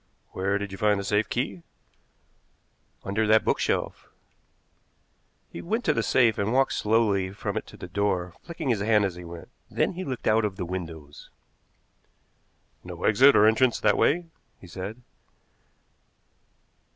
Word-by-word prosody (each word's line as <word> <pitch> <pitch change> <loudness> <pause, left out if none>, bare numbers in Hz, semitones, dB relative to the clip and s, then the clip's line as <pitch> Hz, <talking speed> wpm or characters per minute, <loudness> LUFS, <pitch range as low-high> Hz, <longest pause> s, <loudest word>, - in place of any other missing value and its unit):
"Where 100 +2 -1
did 100 -1 -5
you 95 - -8
find 105 -1 +2
the - - -4
safe 105 +1 0
key?" 100 -8 -3 1.4
"Under 105 +3 -1
that 110 +1 +4
bookshelf." - - -1 1.4
He - - -7
went 225 +7 -2
to 155 - +3
the - - 0
safe 120 -4 +2
and 100 +2 0
walked 135 +2 +2
slowly 105 -4 +1
from 100 - -5
it - - -4
to - - -13
the - - -8
door, 90 -2 -1
flicking 165 -4 -5
his 110 -5 +1
hand 105 -1 +3
as 95 - -2
he 90 0 -10
went. 85 0 -10 0.2
Then - - 0
he 185 +2 -5
looked 130 -8 -5
out 110 +1 +3
of 105 -2 -2
the 90 - -4
windows. 80 -5 -8 1.5
"No - - -9
exit 130 +6 +6
or 105 - +6
entrance 115 +3 +3
that - - +3
way," 175 +4 +2 0.3
he - - -14
said. 100 +7 -8
105 Hz, 155 wpm, -26 LUFS, 95-120 Hz, 1.5 s, exit